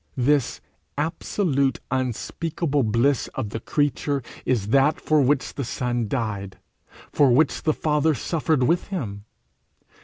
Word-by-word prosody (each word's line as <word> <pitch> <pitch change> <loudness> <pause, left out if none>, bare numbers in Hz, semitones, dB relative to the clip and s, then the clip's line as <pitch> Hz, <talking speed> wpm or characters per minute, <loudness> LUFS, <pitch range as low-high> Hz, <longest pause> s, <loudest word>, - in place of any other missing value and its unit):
This 135 +1 +1 0.4
absolute 145 - 0
unspeakable 140 +4 -1
bliss 120 +4 +2
of 105 - -3
the 115 - -3
creature 145 +1 -1 0.2
is 110 -6 0
that 140 +5 +3
for 155 -1 +2
which 135 +1 +1
the 140 - -3
Son 120 -1 -2
died, 100 -6 -3 0.5
for 140 -3 +4
which 145 +6 +3
the 155 - +1
Father 150 0 +1
suffered 155 +1 0
with 170 +7 +1
him. 105 - -5
135 Hz, 125 wpm, -24 LUFS, 120-150 Hz, 0.5 s, for